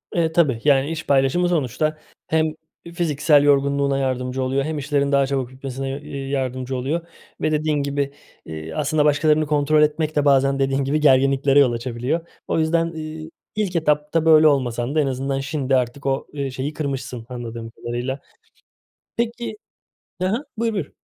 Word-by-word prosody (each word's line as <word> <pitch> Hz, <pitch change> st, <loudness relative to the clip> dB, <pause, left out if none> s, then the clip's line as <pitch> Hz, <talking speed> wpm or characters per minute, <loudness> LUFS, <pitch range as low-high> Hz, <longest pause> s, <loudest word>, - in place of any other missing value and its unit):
Eee, 165 Hz, -2 st, +2 dB
tabii, 150 Hz, -9 st, +2 dB
yani, 140 Hz, 0 st, +3 dB
iş 165 Hz, 0 st, -5 dB
paylaşımı 140 Hz, +6 st, +3 dB
sonuçta 155 Hz, 0 st, 0 dB, 0.3 s
hem 160 Hz, -1 st, +1 dB, 0.4 s
fiziksel 150 Hz, -3 st, +3 dB
yorgunluğuna 140 Hz, -1 st, +2 dB
yardımcı 130 Hz, -1 st, -1 dB
oluyor 135 Hz, +2 st, 0 dB
hem 155 Hz, +1 st, -3 dB
işlerin 140 Hz, 0 st, 0 dB
daha 140 Hz, -1 st, +4 dB
çabuk 135 Hz, -2 st, -2 dB
bitmesine, 135 Hz, 0 st, -5 dB
eee, 140 Hz, -2 st, -6 dB
yardımcı 130 Hz, -1 st, -2 dB
oluyor 150 Hz, +7 st, -2 dB, 0.3 s
ve 155 Hz, -, +1 dB
dediğin 155 Hz, 0 st, +1 dB
gibi, 140 Hz, 0 st, -2 dB, 0.3 s
eee, 80 Hz, 0 st, -7 dB
aslında 150 Hz, -, +1 dB
başkalarını 150 Hz, +1 st, +3 dB
kontrol 150 Hz, +1 st, +3 dB
etmek 150 Hz, +1 st, +1 dB
de 145 Hz, -1 st, +2 dB
bazen 135 Hz, -1 st, +3 dB
dediğin 135 Hz, 0 st, +1 dB
gibi 145 Hz, +3 st, 0 dB
gerginliklere 135 Hz, 0 st, +4 dB
yol 135 Hz, -4 st, +5 dB
açabiliyor. 125 Hz, +7 st, -3 dB, 0.2 s
O -, -, 0 dB
yüzden, 165 Hz, +1 st, +2 dB
ııı, 155 Hz, -1 st, -7 dB, 0.3 s
ilk 205 Hz, -4 st, -1 dB
etapta 150 Hz, 0 st, +1 dB
böyle 155 Hz, -1 st, +7 dB
olmasan 130 Hz, -2 st, 0 dB
da 155 Hz, -, +3 dB
en 140 Hz, -, 0 dB
azından 135 Hz, +1 st, -2 dB
şimdi 135 Hz, -1 st, -1 dB
artık 125 Hz, +2 st, -1 dB
o, 135 Hz, 0 st, -1 dB
ııı, 140 Hz, -2 st, -2 dB
şeyi 130 Hz, +4 st, -4 dB
kırmışsın 135 Hz, -6 st, -4 dB
anladığım 115 Hz, -2 st, -6 dB
kadarıyla. 120 Hz, +4 st, -4 dB, 1.0 s
Peki 235 Hz, -, -2 dB, 0.6 s
Hı 185 Hz, -, +2 dB
hı. 230 Hz, +10 st, -1 dB
Buyur, 230 Hz, 0 st, 0 dB
buyur. 190 Hz, -8 st, -4 dB
140 Hz, 160 wpm, -22 LUFS, 135-155 Hz, 1.0 s, böyle